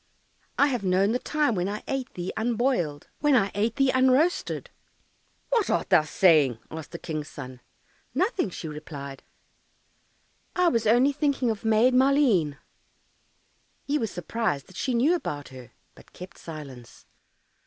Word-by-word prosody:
I 280 - +5
have 250 -7 -1
known 190 +2 +2
the 245 - 0
time 300 -3 0
When 185 -1 -1
I 210 +1 -5
ate 270 -2 -3
thee 175 0 -4
unboiled, 225 - -1
When 295 -2 +3
I 200 -5 +2
ate 220 +3 0
thee 275 -1 +3
unroasted." 260 +7 +2 0.8
"What 460 -5 +2
art - - -1
thou 175 -4 +7
saying?" 155 - +3
asked 160 -2 -7
the 170 - -6
King's 155 -3 -5
son. 130 -4 -9 0.6
"Nothing," 370 - +1
she 170 - -7
replied, 145 -3 -8 1.3
"I 360 -1 +4
was 230 -7 0
only 245 +6 +5
thinking 280 -4 0
of 215 - -6
Maid 225 +3 +4
Maleen." 250 - +3 1.3
He 295 +1 0
was 225 - -1
surprised 175 -6 -2
that 185 - -16
she 255 +4 -1
knew 270 +9 +3
about 145 - -4
her, 130 -2 -12 0.2
but - - -19
kept 180 0 -11
silence. 140 -7 -10
215 Hz, 150 wpm, -26 LUFS, 155-265 Hz, 1.3 s, thou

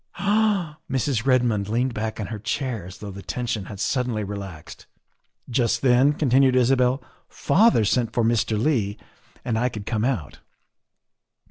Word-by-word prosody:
' - - -52
' - - -36 0.2
"Ah!" 200 -8 +1
Mrs. 130 -2 -1
Redmond 120 -6 +2
leaned 120 +3 0
back 110 0 -4
in 105 - -2
her 110 0 -6
chair 110 -2 -3
as 95 - -10
though 105 -1 -8
the 100 +1 -9
tension 115 -3 -3
had 100 0 -9
suddenly 120 -1 -1
relaxed. 100 -5 -8 0.6
"Just 120 -1 0
then," 130 +3 +4
continued 135 -2 +3
Isabel, 125 +1 +2 0.2
" - - -46
father 185 - +3
sent 115 +2 +1
for 120 - 0
Mr. 110 -1 +1
Leigh 110 -6 0 0.5
and 110 -2 0
I 125 +2 +1
could 105 -4 -8
come 110 -1 -1
out. 120 - -2
120 Hz, 165 wpm, -24 LUFS, 105-130 Hz, 0.6 s, then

